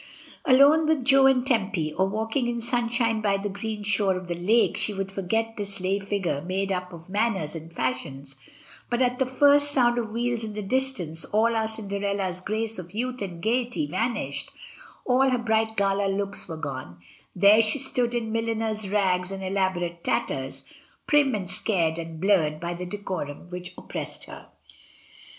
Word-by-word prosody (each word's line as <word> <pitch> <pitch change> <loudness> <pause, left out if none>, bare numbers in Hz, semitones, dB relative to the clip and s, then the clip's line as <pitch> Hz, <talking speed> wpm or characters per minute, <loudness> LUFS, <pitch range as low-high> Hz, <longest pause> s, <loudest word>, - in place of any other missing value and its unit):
Alone 285 +4 +6
with 305 -5 +1
Jo 270 0 +6
and 260 -2 +3
Tempy, 195 - 0
or 190 +4 +1
walking 225 +5 -1
in 240 0 -2
sunshine 235 -1 0
by 200 -2 +2
the 200 +1 -3
green 210 +1 -5
shore 200 -2 +2
of 185 0 -6
the 175 - -2
lake, 200 +7 +2
she 210 - -2
would 195 0 -3
forget 225 +4 -1
this 200 -1 -3
lay 190 +2 0
figiu 195 -7 -2
e - - -11
made 195 +2 -1
up 180 -1 -3
of 170 -1 -11
manners 200 -6 0
and 165 0 -8
fashions, 135 0 -3 0.5
but 240 - 0
at 250 -1 +1
the 265 - +2
first 285 +2 +5
sound 245 -4 +3
of 225 -2 -3
wheels 235 +1 -1
in 215 -1 -5
the 210 0 -4
distance 195 -9 +1
all 230 +2 +2
our 220 -1 +1
Cinderella's 200 -3 -2
grace 220 +2 -2
of 180 +2 -10
youth 250 +2 -3
and 175 -4 -6
gaiety 245 +6 0
vanished, 235 -4 -2 0.6
all 265 +1 +3
her 255 - +2
bright 220 -1 0
gala 200 0 +2
looks 195 +1 -2
were 165 -2 -6
gone; 130 - -6 0.4
there 200 +4 +6
she 215 +5 +3
stood 250 -3 +2
in 225 -2 -2
milliner's 225 -2 -1
rags 185 -2 +1
and 195 0 -5
elaborate 185 -3 -1
tatters, 135 0 -2 0.4
prim 285 -4 +3
and 190 -3 -4
scared 175 -3 +1
and 165 -1 -7
blurred 165 -5 +2
by 170 +1 -3
the 180 +1 -6
decorum 180 -5 -5
which 180 0 -7
oppressed - - -4
her. - - -11
205 Hz, 175 wpm, -26 LUFS, 180-235 Hz, 0.6 s, Alone